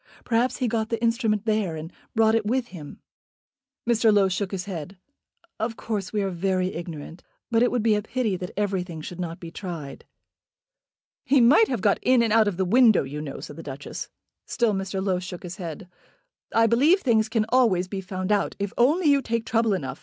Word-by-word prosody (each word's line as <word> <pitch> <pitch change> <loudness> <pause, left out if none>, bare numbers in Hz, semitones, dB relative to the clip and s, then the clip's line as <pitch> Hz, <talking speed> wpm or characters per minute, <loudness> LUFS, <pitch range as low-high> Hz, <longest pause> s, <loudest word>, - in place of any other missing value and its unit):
"Perhaps 240 +2 +1
he 255 - 0
got 220 -1 -1
the 230 - -1
instrument 230 -2 0
there, 215 -6 0
and 160 +2 -8 0.2
brought 220 -1 +4
it 225 -1 +2
with 240 +3 -1
him." 150 -6 -10 0.9
Mr. 230 -2 +4
Low 200 -2 +4
shook 185 +1 -2
his 190 -2 -4
head. 185 -1 -6 0.6
"Of 225 +1 -2
course 205 -4 -4
we 210 -2 0
are 195 - -1
very 185 +1 -1
ignorant; 165 -1 -7 0.3
but 230 0 +3
it 245 - +4
would 245 -3 -1
be 225 -1 +4
a 210 - +1
pity 220 -2 -1
that 180 0 -6
everything 185 -5 -2
should 175 +3 -8
not 170 -2 -4
be 170 -1 -9
tried." 170 -7 -7 1.2
"He 280 - +3
might 275 - +6
have 245 -6 -2
got 200 0 +2
in 250 -2 +4
and 225 -2 +1
out 220 -1 +5
of 195 -4 -2
the 190 - +1
window, 230 +2 +5
you 145 +3 -6
know," 145 -3 -7
said 145 - -9
the - - -7
Duchess. 140 -2 -7 0.4
Still 235 -3 +1
Mr. 195 0 -3
Low 185 -2 +1
shook 180 -1 -8
his 180 +1 -7
head. 175 0 -7 0.6
"I 225 0 +4
believe 285 - +4
things 220 -4 +2
can 220 -1 +1
always 225 -8 +3
be 195 0 -4
found 185 +1 -4
out, 205 -1 +1
if 200 -1 -3
only 305 +9 +3
you 280 -1 +4
take 230 -2 -2
trouble 225 -2 +1
enough. 140 -8 -5
205 Hz, 205 wpm, -25 LUFS, 180-230 Hz, 1.2 s, might